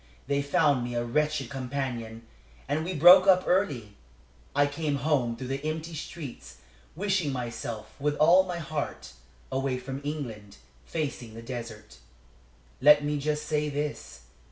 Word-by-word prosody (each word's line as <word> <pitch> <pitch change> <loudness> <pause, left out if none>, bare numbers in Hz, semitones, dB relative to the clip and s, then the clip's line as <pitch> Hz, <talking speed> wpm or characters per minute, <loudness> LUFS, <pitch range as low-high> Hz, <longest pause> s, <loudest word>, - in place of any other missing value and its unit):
They 140 0 0
found 140 -2 +2
me 120 0 -4
a 120 - 0
wretched 150 +1 0
companion, 125 -4 -4 0.4
and 145 +3 0
we 180 +2 -3
broke 180 +5 +8
up 185 -1 +6
early. 140 - 0 0.6
I 145 0 +5
came 145 0 -2
home 140 -5 +1
through 125 +2 -7
the 135 +1 -3
empty 160 +2 -3
streets, 140 - -8 0.4
wishing 190 -4 0
myself, 120 -3 -5
with 145 +1 0
all 170 +5 +6
my 180 -2 -4
heart, 155 -2 -5 0.4
away 135 -1 -1
from 135 +2 -6
England 120 -9 -6 0.3
facing 135 -8 -4
the 115 - -9
desert. 115 - -8 0.8
Let 150 +1 +7
me 145 0 -1
just 150 +1 -1
say 150 -1 0
this. 145 - -4
145 Hz, 145 wpm, -28 LUFS, 125-155 Hz, 0.8 s, broke